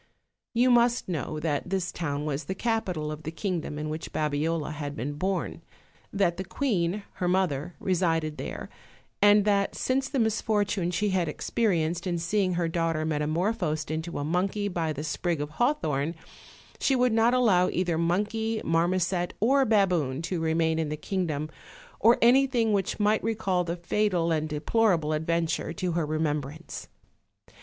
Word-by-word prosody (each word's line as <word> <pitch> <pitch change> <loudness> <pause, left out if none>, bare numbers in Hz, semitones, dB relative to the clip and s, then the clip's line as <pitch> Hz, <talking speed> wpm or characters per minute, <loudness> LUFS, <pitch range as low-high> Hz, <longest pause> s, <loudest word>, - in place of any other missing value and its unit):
You 250 +2 +4
must 240 0 +3
know 155 -3 -3
that 150 +1 -1
this 185 -2 -1
town 145 -3 -3
was 150 0 -2
the 190 - -3
capital 185 -9 -1
of 150 0 -6
the 160 - -5
kingdom 165 -3 -3
in 150 +1 -3
which 155 +1 -5
Babiola 155 +1 -1
had 145 -1 -5
been 135 +6 -3
born; 185 +6 -2 0.5
that 190 -4 +1
the 190 - -3
queen, 200 -4 -1
her 180 - -1
mother, 175 -3 0
resided 165 -4 0
there, - - -5 0.5
and 205 0 +6
that 200 -1 +2
since 265 +1 0
the 280 - -2
misfortune 210 -5 +1
she 190 +4 0
had 180 -4 +1
experienced 175 -6 0
in 175 -1 0
seeing 185 +2 0
her 170 -1 0
daughter 165 -1 0
metamor 155 +6 0
phosed 155 -6 -2
into 160 +2 -3
a 145 - -2
monkey 190 +6 0
by 170 -4 -1
the 150 0 -4
sprig 165 +2 -1
of 145 0 -4
hawthorn, 160 - 0 0.6
she 270 - +2
would 250 -2 +3
not 225 +2 +4
allow 190 -8 +4
either 175 -3 0
monkey, 215 +6 0
marmoset 175 +2 +1
or 270 +5 +4
baboon 180 - +2
to 170 0 -2
remain 160 0 +1
in 160 -2 -1
the 150 - -3
kingdom, 155 -4 -2 0.5
or 230 +2 +5
anything 245 -3 +4
which 195 0 -1
might 210 +1 +2
recall 200 -5 0
the 170 0 -3
fatal 175 -1 0
and 155 -1 0
deplorable 160 +1 +1
adventure 160 +1 -1
to 180 +1 -2
her 165 -2 -1
remembrance. 155 0 -3
175 Hz, 160 wpm, -27 LUFS, 155-205 Hz, 0.6 s, and